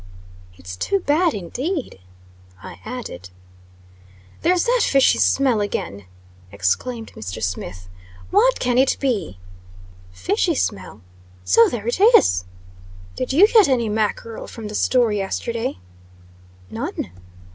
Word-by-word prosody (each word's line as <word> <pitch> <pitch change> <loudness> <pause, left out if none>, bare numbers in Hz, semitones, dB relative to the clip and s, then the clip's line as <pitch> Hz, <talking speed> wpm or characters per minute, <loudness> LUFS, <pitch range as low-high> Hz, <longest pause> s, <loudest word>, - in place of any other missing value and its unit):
"It 90 - -18
is 90 0 -6
too 395 - -1
bad, 330 +2 +2
indeed," 255 - -4 0.6
I - - -11
added. 220 - -7 1.1
"There's 355 +1 +2
that - - +2
fishy 275 -1 +3
smell 260 -6 +2
again!" 100 - -4 0.5
exclaimed 220 - -2
Mr. 95 -1 -7
Smith. 90 0 -5 0.4
"What 480 +6 +3
can 250 0 +1
it 265 - +3
be?" 240 - -2 0.7
"Fishy 90 0 0
smell! 95 +1 -3 0.4
So 230 - +5
there 225 -2 -5
is." 240 - +4 0.7
"Did 255 - -3
you 345 +10 +6
get 435 -4 +5
any 235 -4 +1
mackerel 220 +1 -2
from 220 -2 -8
the - - -8
store 245 -1 +2
yesterday?" 215 - -3 0.9
"None." - - -5
230 Hz, 115 wpm, -21 LUFS, -, 1.1 s, you